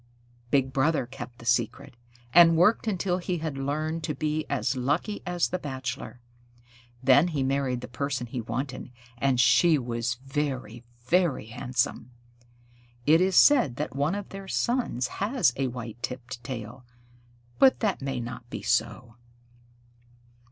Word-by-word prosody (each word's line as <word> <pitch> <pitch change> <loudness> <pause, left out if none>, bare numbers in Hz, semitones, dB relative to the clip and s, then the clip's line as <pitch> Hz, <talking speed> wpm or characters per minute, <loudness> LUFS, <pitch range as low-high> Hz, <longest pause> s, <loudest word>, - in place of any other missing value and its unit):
Big 135 -1 +1
Brother 145 +1 +2
kept 120 0 -9
the 115 - -13
secret, 120 +1 0 0.4
and 165 -1 +7
worked 210 +7 +3
until 185 -3 0
he 180 0 -2
had 160 -3 -4
learned 155 +4 -2
to 150 - -3
be 155 +2 -2
as - - 0
lucky 145 - -1
as 175 -2 0
the 185 - -2
Bachelor. 130 -3 -6 0.8
Then 135 +5 +6
he 150 -6 -1
married 130 -2 0
the - - -7
person 135 0 -3
he 120 +1 -5
wanted, 130 +4 -4 0.3
and 135 -1 +2
she 140 +7 +5
was 120 -2 -2
very, 130 -5 -3 0.2
very 170 -5 +2
handsome. 120 +1 -2 1.0
It 160 +3 +5
is 185 0 +2
said 255 - +6
that 150 +1 -4
one 145 +6 0
of 205 -1 -6
their 195 0 -8
sons 235 - 0 0.2
has 215 - +2
a 135 -1 -1
white 120 -2 -7
tipped 125 -1 -6
tail, 120 0 -7 0.8
but 265 -1 +6
that 210 -8 0
may 135 -2 -3
not 120 0 -7
be - - -6
so. 115 0 -1
135 Hz, 145 wpm, -27 LUFS, 125-165 Hz, 1.0 s, and